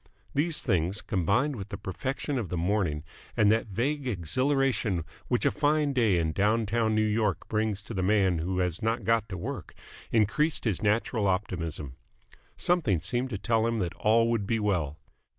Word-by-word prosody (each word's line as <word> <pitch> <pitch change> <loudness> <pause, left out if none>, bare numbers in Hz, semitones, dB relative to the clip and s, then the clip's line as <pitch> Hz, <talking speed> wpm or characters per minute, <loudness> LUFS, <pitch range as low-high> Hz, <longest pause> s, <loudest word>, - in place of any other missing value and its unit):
These 155 +3 0
things, 95 - +1
combined 120 - 0
with 100 -2 -7
the 100 - -5
perfection 130 - -3
of 105 -7 -4
the 90 - -2
morning 85 -4 0 0.3
and 105 -1 +5
that 115 +1 +1
vague 130 +7 -1
exhilaration 120 - 0 0.2
which 125 - 0
a - - +4
fine 150 -1 +1
day 115 -8 +3
in 80 -2 +1
down 105 +6 +2
town 110 +1 +1
New 110 0 +3
York 105 -2 0
brings 110 -2 -1
to 115 - -8
the 95 - -1
man 95 -3 +3
who 90 +3 -2
has 90 -1 -1
not 115 +1 0
got 115 -1 +1
to 95 - -4
work, 85 - -6 0.4
increased 115 +9 +2
his 110 -6 0
natural 110 0 +1
optimism. 85 -8 -2 0.6
Something 150 - +2
seemed 120 +10 -1
to 105 - -3
tell 115 +2 +1
him 115 0 0
that 90 -5 -2
all 115 +3 +3
would 105 -4 -1
be 115 +1 +1
well. 85 -8 0
105 Hz, 180 wpm, -28 LUFS, 95-120 Hz, 0.6 s, and